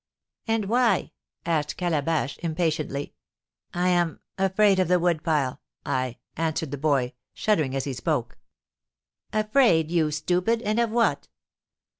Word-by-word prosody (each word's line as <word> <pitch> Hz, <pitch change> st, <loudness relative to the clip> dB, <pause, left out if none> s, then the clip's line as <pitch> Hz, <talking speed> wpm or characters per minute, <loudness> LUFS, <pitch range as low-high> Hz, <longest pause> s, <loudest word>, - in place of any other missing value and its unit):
"And 225 Hz, -2 st, +1 dB
why?" 240 Hz, +3 st, +2 dB, 0.3 s
asked 155 Hz, -3 st, -1 dB
Calabash, 155 Hz, -5 st, -1 dB
impatiently. 155 Hz, -4 st, -2 dB, 0.6 s
"I 180 Hz, +1 st, +1 dB
am 175 Hz, -2 st, +1 dB, 0.2 s
afraid 195 Hz, +1 st, +3 dB
of 185 Hz, -, +2 dB
the 180 Hz, +1 st, +4 dB
wood 170 Hz, -2 st, +1 dB
pile 150 Hz, -5 st, 0 dB, 0.2 s
I 130 Hz, -2 st, -1 dB
" -, -, -51 dB
answered 160 Hz, -2 st, -2 dB
the 145 Hz, -, -3 dB
boy, 135 Hz, -4 st, +1 dB, 0.2 s
shuddering 155 Hz, -11 st, +1 dB
as 135 Hz, -, -1 dB
he 140 Hz, -, -3 dB
spoke. 120 Hz, -, -2 dB, 0.9 s
"Afraid 215 Hz, -, +3 dB
you 165 Hz, -3 st, +2 dB
stupid! 180 Hz, +9 st, 0 dB
And 215 Hz, +1 st, 0 dB
of 235 Hz, -1 st, +2 dB
what?" 230 Hz, +1 st, +1 dB
165 Hz, 135 wpm, -25 LUFS, 150-195 Hz, 0.9 s, the